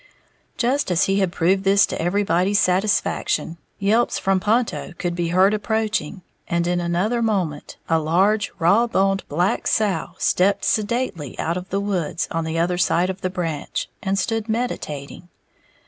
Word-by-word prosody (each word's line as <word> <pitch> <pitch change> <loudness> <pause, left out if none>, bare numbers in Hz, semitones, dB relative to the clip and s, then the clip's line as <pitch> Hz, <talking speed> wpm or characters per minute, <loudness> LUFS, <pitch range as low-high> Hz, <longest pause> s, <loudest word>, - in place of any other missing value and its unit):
Just 265 +2 +1
as 180 -1 +2
he 195 +1 +1
had 190 -3 +1
proved 185 +3 +1
this 200 +1 +5
to - - -5
everybody's 195 +2 +1
satisfaction, 185 -3 0 0.2
yelps 215 +4 +1
from 195 -1 +1
Ponto 220 -2 0
could 175 -1 -2
be 170 -1 -2
heard 185 +4 +4
approaching, 210 -5 -2 0.2
and 170 0 0
in 175 0 0
another 180 +8 0
moment 185 -10 -2
a 165 -1 +2
large, 195 +7 +1
raw 200 +7 +3
boned 195 -3 +1
black 175 +8 0
sow 200 -6 0
stepped 195 +3 +2
sedately 210 - -1
out 165 - -1
of 180 +1 -6
the 195 - -1
woods 185 -5 -2
on 165 0 -2
the 160 +1 -3
other 175 +2 0
side 180 +1 +2
of 190 +1 -10
the 185 - -1
branch, 165 -5 -3
and 195 -2 -1
stood 225 +2 -1
meditating. 175 - -4
190 Hz, 160 wpm, -22 LUFS, 170-210 Hz, 0.2 s, this